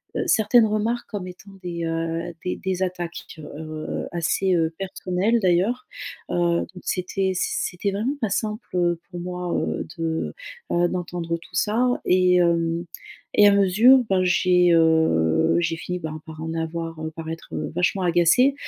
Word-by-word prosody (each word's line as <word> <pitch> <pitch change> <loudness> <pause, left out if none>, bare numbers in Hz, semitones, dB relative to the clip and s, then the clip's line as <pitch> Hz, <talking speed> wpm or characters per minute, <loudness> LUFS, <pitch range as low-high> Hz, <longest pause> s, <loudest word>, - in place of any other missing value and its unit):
heu, - - 0
certaines 220 +1 +4
remarques 220 +3 -1
comme 195 -4 -5
étant 180 +2 -12
des, 170 -1 -4
heu, 165 0 -2 0.2
des 180 - -1
des 190 -1 -2
attaques, 175 -2 -4
tu 160 - -11
vois. - - -9
Alors, 155 +1 -7 0.3
heu, - - -5
assez, 175 +3 +1
heu, 165 -1 +1
personnelles 195 +3 0
d'ailleurs, 190 +7 +1 0.4
heu, 170 -1 +2
donc 180 - -12
c'était 190 +1 -1
c 440 - 0
c'était 235 - -2
vraiment 225 +8 -1
pas 220 - 0
simple, 215 +3 -2
heu, 175 -1 +1
pour 175 - -6
moi, 180 0 -4
heu, - - -2
de, 165 -1 -2 0.4
heu, 175 0 +3
d'entendre 175 -2 -3
tout - - -14
ça 245 +4 +1
et 180 0 +4
hem, 170 -1 +1 0.5
et 205 0 +7
à - - +7
mesure, 210 +7 +6
ben, 190 -1 +2
j'ai, 180 -1 +3
heu, 160 - +3
j'ai 165 -1 -1
fini, 180 +2 -4
ben, 155 -1 -6
par 160 0 -9
en 160 0 -4
avoir 165 0 -4
heu, 160 - -2
par 160 -1 -6
être, 165 0 -8
heu, - - -3
vachement 185 +2 +1
agacée, 175 +10 +4
180 Hz, 175 wpm, -23 LUFS, 165-195 Hz, 0.5 s, et